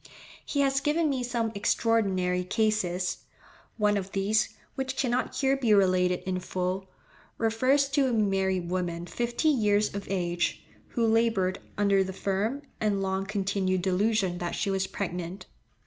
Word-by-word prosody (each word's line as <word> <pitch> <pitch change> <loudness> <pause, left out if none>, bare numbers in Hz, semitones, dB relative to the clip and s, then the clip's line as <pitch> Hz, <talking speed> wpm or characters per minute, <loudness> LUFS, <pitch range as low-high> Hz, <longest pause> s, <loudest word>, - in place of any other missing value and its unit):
He 285 - -1
has 270 -1 +2
given 300 +1 +1
me 260 -2 -1
some 235 -2 -1
extraordinary 195 -4 +1
cases; 185 -3 0 0.6
one 210 -2 +2
of 195 -1 -5
these, 210 +2 +2 0.2
which 265 0 -3
cannot 250 -1 0
here 270 -1 +2
be 235 -6 +3
related 185 -2 +3
in 185 -1 -2
full, 185 +1 -3 0.5
refers 255 +5 +2
to 275 -1 +2
a - - 0
married 190 -5 +1
woman 175 -2 -2
fifty 240 - 0
years 210 -6 +2
of 200 0 -5
age, 175 -2 -1 0.3
who 235 -2 +2
laboured 225 -5 +2 0.2
under 200 -1 +3
the 190 0 -5
firm 205 +9 -1 0.2
and 205 -2 0
long 190 0 -1
continued 190 -2 0
delusion 190 -1 +1
that 175 -1 -3
she 200 - -1
was 190 0 0
pregnant. 180 -1 -5
200 Hz, 145 wpm, -28 LUFS, 185-230 Hz, 0.6 s, be